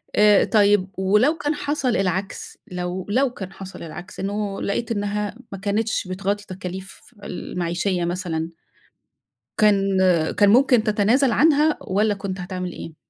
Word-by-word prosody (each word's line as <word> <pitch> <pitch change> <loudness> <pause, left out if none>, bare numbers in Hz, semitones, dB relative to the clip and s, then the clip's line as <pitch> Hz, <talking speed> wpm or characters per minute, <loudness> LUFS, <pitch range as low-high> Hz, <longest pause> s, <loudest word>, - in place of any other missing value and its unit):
آآ 210 -1 +6
طيّب 205 -3 +3
ولو 210 +12 +3
كان 295 +1 -1
حصل 290 -3 -1
العكس، 190 +1 -3
لو 180 +1 -4
لو 260 +5 +2
كان 190 -5 -8
حصل 195 -2 -9
العكس 170 +4 -9
إنّه 200 0 -3
لقيت 230 +4 -2
إنّها 205 0 -2 0.2
ما 195 - -5
كانتش 205 0 -1
بتغطي 200 +2 -2
تكاليف 185 0 -7 0.2
المعيشية 180 0 -2
مثلًا 170 -2 -3 1.1
كان 195 -2 +3
آآ 175 -4 +3
كان 205 -1 +4
ممكن 250 0 +5
تتنازل 220 +5 +3
عنها 305 +3 +4
والّا 205 +2 +1
كُنت 195 -2 -5
هتعمل 180 0 -5
إيه؟ 165 - -8
200 Hz, 140 wpm, -22 LUFS, 185-215 Hz, 1.1 s, آآ